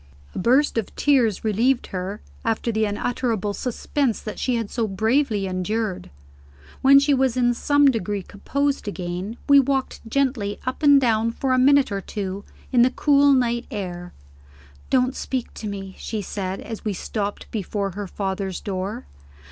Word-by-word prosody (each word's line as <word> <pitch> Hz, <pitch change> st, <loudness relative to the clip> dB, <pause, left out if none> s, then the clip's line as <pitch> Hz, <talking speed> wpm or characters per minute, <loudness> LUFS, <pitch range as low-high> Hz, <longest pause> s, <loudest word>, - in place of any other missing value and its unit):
A -, -, -4 dB
burst 250 Hz, +5 st, +3 dB
of 220 Hz, -, -6 dB
tears 250 Hz, -8 st, +2 dB
relieved 235 Hz, +5 st, +2 dB
her, 190 Hz, +3 st, -4 dB, 0.2 s
after 225 Hz, +1 st, 0 dB
the 220 Hz, 0 st, +1 dB
unutterable 215 Hz, -1 st, -1 dB
suspense 250 Hz, +1 st, -1 dB
that 215 Hz, -, -7 dB
she 255 Hz, -, 0 dB
had 230 Hz, -3 st, -3 dB
so 230 Hz, -3 st, -1 dB
bravely 220 Hz, +2 st, +1 dB
endured. 185 Hz, +1 st, -2 dB, 0.7 s
When 275 Hz, +1 st, +7 dB
she 280 Hz, +1 st, +4 dB
was 260 Hz, -2 st, +1 dB
in 245 Hz, -1 st, +3 dB
some 285 Hz, +4 st, +3 dB
degree 205 Hz, -4 st, -3 dB
composed 280 Hz, +8 st, -2 dB
again, 185 Hz, +3 st, -4 dB
we 280 Hz, 0 st, +8 dB
walked 270 Hz, 0 st, 0 dB
gently 245 Hz, -6 st, 0 dB
up 255 Hz, +4 st, -3 dB
and 285 Hz, -2 st, +7 dB
down 230 Hz, -3 st, +2 dB
for 260 Hz, +3 st, -1 dB
a 255 Hz, -, +3 dB
minute 280 Hz, -1 st, +5 dB
or 200 Hz, -1 st, -2 dB
two 195 Hz, 0 st, -5 dB, 0.3 s
in 245 Hz, -2 st, +4 dB
the 250 Hz, -, +6 dB
cool 285 Hz, +1 st, +4 dB
night 240 Hz, -2 st, +1 dB
air. 175 Hz, -4 st, -5 dB, 0.8 s
"Don't 255 Hz, 0 st, +2 dB
speak 255 Hz, -3 st, -3 dB
to 215 Hz, -, -6 dB
me," 195 Hz, -2 st, -6 dB
she 215 Hz, -2 st, -4 dB
said, 190 Hz, 0 st, -4 dB
as 225 Hz, -2 st, -7 dB
we 210 Hz, -, -1 dB
stopped 205 Hz, +2 st, -4 dB
before 200 Hz, -1 st, -2 dB
her 200 Hz, +2 st, -5 dB
father's 190 Hz, -1 st, -3 dB
door. 200 Hz, +5 st, -4 dB
225 Hz, 165 wpm, -23 LUFS, 200-260 Hz, 0.8 s, we